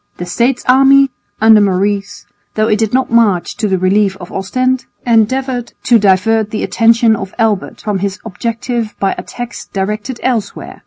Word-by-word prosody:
The 175 - -5
States' 235 +9 -1
army 270 +1 +5 0.3
under 220 -1 +6
Maurice, 200 +1 -1 0.3
though 215 0 +1
it 210 -2 +1
did 220 -2 0
not 260 -1 0
march 215 -7 +2
to 215 - -1
the 190 -1 0
relief 195 +1 +1
of 175 -2 -11
Ostend, 255 +6 -1 0.2
endeavoured 245 +2 0
to 235 -2 +4
divert 205 +2 +2
the 215 - -3
attention 230 -1 +3
of 195 -2 -7
Albert 220 -4 -1
from 205 -2 -2
his 200 +1 -3
objective 230 +1 -4
by 195 - 0
attacks 245 -1 -7
directed 210 +5 -4
elsewhere. 230 -6 -3
220 Hz, 160 wpm, -14 LUFS, 200-240 Hz, 0.3 s, under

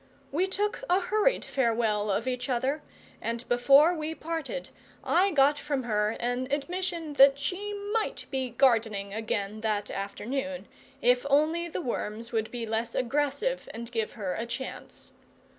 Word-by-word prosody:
We 355 +6 +1
took 415 +5 -1
a 360 +2 +5
hurried 430 +6 +1
farewell 225 -5 +1
of 205 +5 0
each 250 0 -2
other, 265 +4 0 0.4
and 235 +1 -3
before 275 +7 +6
we 315 -1 -3
parted 330 +11 -4 0.3
I 375 +3 +3
got 290 -3 +4
from 285 -3 -2
her 210 -2 0
an 245 +2 -1
admission 330 +2 -2
that 275 0 +8
she 390 +8 -3 0.2
might 450 -1 -1
be 265 -2 -1
gardening 225 -6 +2
again 215 -1 -2
that 210 -2 -1
afternoon, 265 +8 -4 0.4
if 245 0 +4
only 315 +4 +3
the 340 - -4
worms 230 -4 -4
would 220 -2 -1
be 240 -2 -4
less 225 +1 -2
aggressive 285 - 0
and 235 +1 -7
give 225 -3 -2
her 195 -5 -3
a 230 - -3
chance. 260 +3 -7
260 Hz, 150 wpm, -28 LUFS, 225-310 Hz, 0.4 s, that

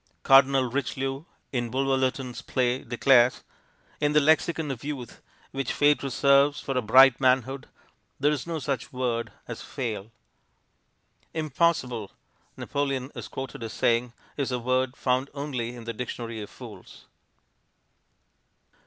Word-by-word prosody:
Cardinal 135 0 +6
Richelieu 135 +2 -3 0.3
in 120 -3 -2
Bulwer 135 +2 +1
Lytton's 130 -1 -2
play 125 0 0
declares: 125 0 +3 0.6
"In 150 0 +1
the 150 - +6
lexicon 155 0 +2
of 125 -3 -7
youth, 140 -5 -6 0.3
which 135 -1 -2
fate 145 0 +3
reserves 140 +2 +3
For 135 - -4
a 125 - +2
bright 130 +3 +6
manhood, 130 +1 +1 0.5
there 145 +2 +3
is 150 0 -3
no 165 -1 -2
such 135 -4 -3
word 125 -2 -2 0.2
As - - -7
'fail.'" 110 -5 -5 1.3
"Impossible," 150 - 0 0.5
Napoleon 140 -2 -2
is - - -7
quoted 130 -2 -7
as 115 -1 -5
saying, 120 +1 +1 0.3
"is 140 -2 -1
a 125 - 0
word 130 +2 0
found 130 +2 0
only 125 -5 -4
in 120 - -9
the 115 0 -5
dictionary 115 -1 -5
of 105 - -8
fools." - - -12
130 Hz, 135 wpm, -26 LUFS, 120-140 Hz, 1.3 s, Cardinal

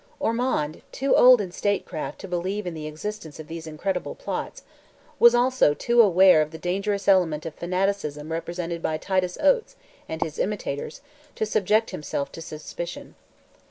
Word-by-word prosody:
Ormond, 225 - -1
too 275 +1 +1
old 250 -2 +8
in 185 -3 -5
statecraft 190 -5 -2
to 195 - -7
believe 185 +3 -2
in 175 - -4
the 155 -1 -6
existence 160 +1 -7
of 155 - -8
these 165 0 -7
incredible 180 +4 -3
plots, - - -5 0.6
was 235 0 +7
also 245 - +3
too 235 +8 -1
well 230 - +8
aware 185 -3 +6
of 155 - -1
the 160 - -9
dangerous 200 +3 -2
element 170 -6 +3
of 165 - -5
fanaticism 175 -4 -2
represented 170 +1 -4
by 155 -1 -1
Titus 185 +1 -1
Oates, 375 +11 +2 0.3
and 160 +1 -1
his 155 -2 -7
imitators, 185 -8 -3 0.3
to 220 - -1
subject 215 +1 +1
himself 140 -2 -4
to 165 - -9
suspicion. 165 +2 -7
180 Hz, 160 wpm, -25 LUFS, 160-210 Hz, 0.6 s, old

